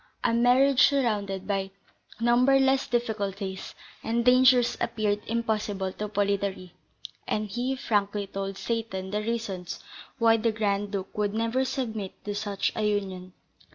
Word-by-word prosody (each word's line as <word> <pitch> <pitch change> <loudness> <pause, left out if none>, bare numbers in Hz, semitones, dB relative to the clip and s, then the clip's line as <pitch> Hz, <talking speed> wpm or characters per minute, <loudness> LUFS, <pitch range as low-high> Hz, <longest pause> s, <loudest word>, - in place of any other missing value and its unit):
A - - +2
marriage 250 +3 +4
surrounded 205 -8 0
by 195 -1 -1 0.5
numberless 265 +3 +4
difficulties 200 -5 -3 0.3
and 235 +1 0
dangers 255 -1 +5
appeared 210 -1 0
impossible 215 -4 -1
to 210 - -4
Polidori, 200 -3 -1 0.5
and 215 0 -1
he 245 +6 -2
frankly 205 -5 0
told 195 0 -5
Seyton 205 -5 -3
the 210 +1 -1
reasons 210 -6 -4 0.3
why 230 -2 +5
the 225 +1 +1
Grand 205 -2 -1
Duke 195 -2 -5
would 210 0 -1
never 230 +4 +1
submit 225 -7 -3
to 205 - -2
such 205 -1 -1
a - - -2
union. 190 -3 -2
210 Hz, 130 wpm, -27 LUFS, 200-235 Hz, 0.5 s, dangers